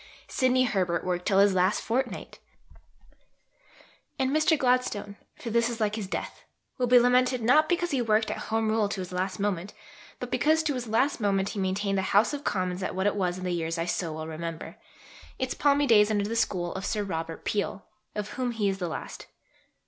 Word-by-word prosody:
Sidney 255 Hz, 0 st, +2 dB
Herbert 185 Hz, -7 st, 0 dB
worked 180 Hz, -1 st, -2 dB
till 195 Hz, -, +3 dB
his 200 Hz, 0 st, +5 dB
last 185 Hz, 0 st, +2 dB
fortnight. 250 Hz, +2 st, -3 dB, 1.8 s
And 265 Hz, 0 st, 0 dB
Mr. 310 Hz, +2 st, +3 dB
Gladstone 250 Hz, -6 st, 0 dB, 0.2 s
for 230 Hz, -, -6 dB
this 235 Hz, +1 st, +2 dB
is 235 Hz, -1 st, -5 dB
like 215 Hz, -1 st, +1 dB
his 215 Hz, -4 st, -4 dB
death -, -, -5 dB, 0.4 s
will 250 Hz, -, +2 dB
be 250 Hz, +1 st, +7 dB
lamented 250 Hz, 0 st, +3 dB
not 305 Hz, +7 st, +4 dB
because 350 Hz, -1 st, 0 dB
he 270 Hz, -3 st, +1 dB
worked 220 Hz, -1 st, +2 dB
at -, -, -6 dB
Home 220 Hz, 0 st, +1 dB
Rule 215 Hz, -2 st, +1 dB
to 195 Hz, -, -3 dB
his 185 Hz, -, -7 dB
last 185 Hz, +1 st, -2 dB
moment, 200 Hz, -1 st, -2 dB, 0.4 s
but -, -, -6 dB
because 315 Hz, +1 st, +3 dB
to 300 Hz, -2 st, 0 dB
his 250 Hz, -2 st, -4 dB
last 255 Hz, +7 st, +1 dB
moment 195 Hz, -1 st, +1 dB
he 210 Hz, -, -5 dB
maintained 195 Hz, +1 st, 0 dB
the 190 Hz, -, -2 dB
House 215 Hz, +7 st, +4 dB
of 290 Hz, 0 st, -4 dB
Commons 185 Hz, -1 st, -1 dB
at 185 Hz, -, -3 dB
what 190 Hz, +1 st, -1 dB
it 205 Hz, -, +2 dB
was 180 Hz, -3 st, -1 dB
in 185 Hz, -, -7 dB
the 180 Hz, -, -1 dB
years 165 Hz, -1 st, -2 dB
I 165 Hz, -, -1 dB
so 170 Hz, -2 st, -2 dB
well 155 Hz, 0 st, -5 dB
remember, 160 Hz, +1 st, -6 dB, 0.6 s
its 260 Hz, -1 st, -2 dB
palmy 285 Hz, 0 st, +3 dB
days 215 Hz, -4 st, +5 dB
under 205 Hz, -2 st, +1 dB
the 225 Hz, +2 st, -3 dB
School 175 Hz, -6 st, 0 dB
of 190 Hz, -, -5 dB
Sir 210 Hz, 0 st, -1 dB
Robert 165 Hz, -4 st, -5 dB
Peel, 200 Hz, -1 st, -2 dB, 0.3 s
of 210 Hz, -1 st, -3 dB
whom 250 Hz, -2 st, -2 dB
he 210 Hz, -3 st, 0 dB
is 195 Hz, 0 st, -3 dB
the 180 Hz, -, -2 dB
last. 160 Hz, -, -7 dB
210 Hz, 210 wpm, -27 LUFS, 185-250 Hz, 1.8 s, be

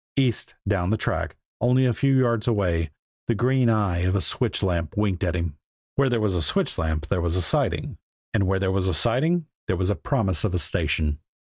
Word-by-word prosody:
East, 130 Hz, -5 st, 0 dB
down 95 Hz, -3 st, +1 dB
the 110 Hz, -, +2 dB
track, -, -, -2 dB, 0.2 s
only 125 Hz, +2 st, +3 dB
a 125 Hz, -, +3 dB
few 135 Hz, +3 st, +2 dB
yards 120 Hz, -3 st, +1 dB
away, 90 Hz, -8 st, +1 dB, 0.4 s
the 115 Hz, -, +1 dB
green 125 Hz, +2 st, +2 dB
eye 100 Hz, -6 st, +1 dB
of 90 Hz, +2 st, +1 dB
a -, -, +3 dB
switch -, -, -1 dB
lamp 85 Hz, -3 st, -1 dB
winked 100 Hz, -3 st, 0 dB
at 90 Hz, -2 st, 0 dB
him. 85 Hz, -4 st, -3 dB, 0.4 s
Where 135 Hz, -1 st, +3 dB
there 120 Hz, -2 st, +1 dB
was 105 Hz, -3 st, +1 dB
a 90 Hz, -, 0 dB
switch 75 Hz, -, +1 dB
lamp 80 Hz, -1 st, -1 dB
there 90 Hz, +2 st, -1 dB
was 85 Hz, 0 st, 0 dB
a 90 Hz, -, +1 dB
siding, 80 Hz, -, 0 dB, 0.3 s
and 100 Hz, -4 st, +2 dB
where 95 Hz, 0 st, +2 dB
there 95 Hz, 0 st, 0 dB
was 95 Hz, -1 st, 0 dB
a 90 Hz, -, +1 dB
siding 155 Hz, -, +2 dB, 0.2 s
there 95 Hz, -, 0 dB
was 95 Hz, +3 st, +1 dB
promise 100 Hz, -, 0 dB
of 95 Hz, -4 st, 0 dB
a -, -, +2 dB
station. 75 Hz, -2 st, -1 dB
100 Hz, 215 wpm, -24 LUFS, 85-120 Hz, 0.4 s, only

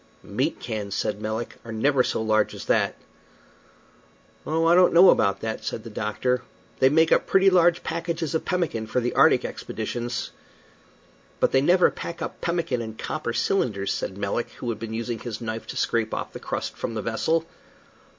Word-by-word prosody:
"Meat -, -, -2 dB
cans," 105 Hz, -4 st, -4 dB
said 105 Hz, 0 st, -2 dB
Melick, 110 Hz, +2 st, -4 dB
"are 115 Hz, -, -8 dB
never 130 Hz, +4 st, +2 dB
so 110 Hz, -, -1 dB
large 110 Hz, 0 st, +1 dB
as -, -, -8 dB
that." -, -, +2 dB, 1.5 s
"Oh, 160 Hz, +1 st, +1 dB
I 165 Hz, -, +5 dB
don't 180 Hz, 0 st, +5 dB
know 180 Hz, +2 st, +9 dB
about 100 Hz, -2 st, +1 dB
that," 110 Hz, -1 st, -4 dB
said 110 Hz, -, -4 dB
the 115 Hz, -, -9 dB
doctor, 125 Hz, +4 st, -1 dB, 0.4 s
"they 130 Hz, -, +6 dB
make 160 Hz, +3 st, +3 dB
up -, -, +3 dB
pretty 195 Hz, 0 st, +5 dB
large 175 Hz, -1 st, +4 dB
packages 165 Hz, -1 st, -3 dB
of 160 Hz, -, 0 dB
pemmican 160 Hz, -12 st, -1 dB
for 125 Hz, -, 0 dB
the 120 Hz, 0 st, -1 dB
arctic -, -, +5 dB
expeditions." 120 Hz, -1 st, -4 dB, 1.1 s
"But -, -, +3 dB
they 135 Hz, -, +4 dB
never 180 Hz, +5 st, +4 dB
pack 170 Hz, -, -7 dB
up -, -, -6 dB
pemmican 170 Hz, -8 st, -1 dB
in 110 Hz, -1 st, -6 dB
copper 155 Hz, +1 st, -3 dB
cylinders," 115 Hz, -, 0 dB
said 95 Hz, -, -4 dB
Melick, 100 Hz, +4 st, -2 dB
who 120 Hz, -, -5 dB
had 110 Hz, -2 st, -3 dB
been 110 Hz, 0 st, -5 dB
using 115 Hz, 0 st, -3 dB
his 120 Hz, -3 st, -6 dB
knife 110 Hz, -1 st, -5 dB
to -, -, -6 dB
scrape 115 Hz, -2 st, 0 dB
off -, -, -5 dB
the -, -, -7 dB
crust -, -, -4 dB
from 115 Hz, -, -4 dB
the 110 Hz, -, -3 dB
vessel. 160 Hz, +9 st, 0 dB
120 Hz, 185 wpm, -25 LUFS, 110-165 Hz, 1.5 s, know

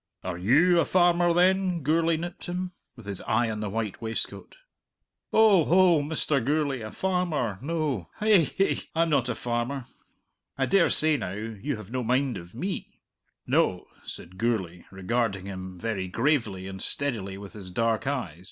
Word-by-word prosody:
"Are 90 Hz, -1 st, -3 dB
you 155 Hz, -, +4 dB
a 165 Hz, -, +3 dB
farmer, 175 Hz, -1 st, +3 dB
then?" 180 Hz, -1 st, +2 dB
Gourlay 165 Hz, +3 st, +2 dB
nipped 175 Hz, +2 st, -6 dB
him, 180 Hz, +1 st, -3 dB, 0.2 s
with 115 Hz, -5 st, -13 dB
his 100 Hz, -2 st, -4 dB
eye 115 Hz, +1 st, +1 dB
on 105 Hz, -, -4 dB
the 105 Hz, -1 st, -3 dB
white 110 Hz, -1 st, -3 dB
waistcoat. 115 Hz, 0 st, -4 dB, 0.8 s
"Oh 215 Hz, -6 st, +6 dB
oh, 175 Hz, -3 st, +5 dB
Mr. 145 Hz, -3 st, 0 dB
Gourlay! 145 Hz, -1 st, 0 dB
A 110 Hz, -, -5 dB
farmer, 165 Hz, -, -1 dB
no. 145 Hz, -, -2 dB
Hi 210 Hz, -7 st, +4 dB
hi! 195 Hz, -, +2 dB, 0.2 s
I'm 165 Hz, 0 st, +2 dB
not 130 Hz, -4 st, +2 dB
a 120 Hz, -, -1 dB
farmer. 120 Hz, +3 st, -2 dB, 0.7 s
I 135 Hz, -, +2 dB
dare 190 Hz, +3 st, +4 dB
say, 155 Hz, -1 st, +3 dB
now, 95 Hz, -6 st, -4 dB
you 110 Hz, +6 st, -4 dB
have 110 Hz, -1 st, -10 dB
no 130 Hz, 0 st, -1 dB
mind 130 Hz, +1 st, +1 dB
of 85 Hz, +4 st, -13 dB
me?" 185 Hz, +10 st, -5 dB, 0.5 s
"No," -, -, +1 dB, 0.2 s
said 90 Hz, +2 st, -9 dB
Gourlay, 95 Hz, -7 st, -1 dB
regarding 100 Hz, 0 st, -1 dB
him 95 Hz, -1 st, -7 dB
very 100 Hz, -2 st, -3 dB
gravely 115 Hz, -3 st, 0 dB
and 95 Hz, -1 st, -7 dB
steadily 110 Hz, -9 st, -2 dB
with 100 Hz, 0 st, -10 dB
his 100 Hz, -3 st, -9 dB
dark 115 Hz, +5 st, 0 dB
eyes. 110 Hz, -, -3 dB
125 Hz, 165 wpm, -27 LUFS, 105-165 Hz, 0.8 s, Oh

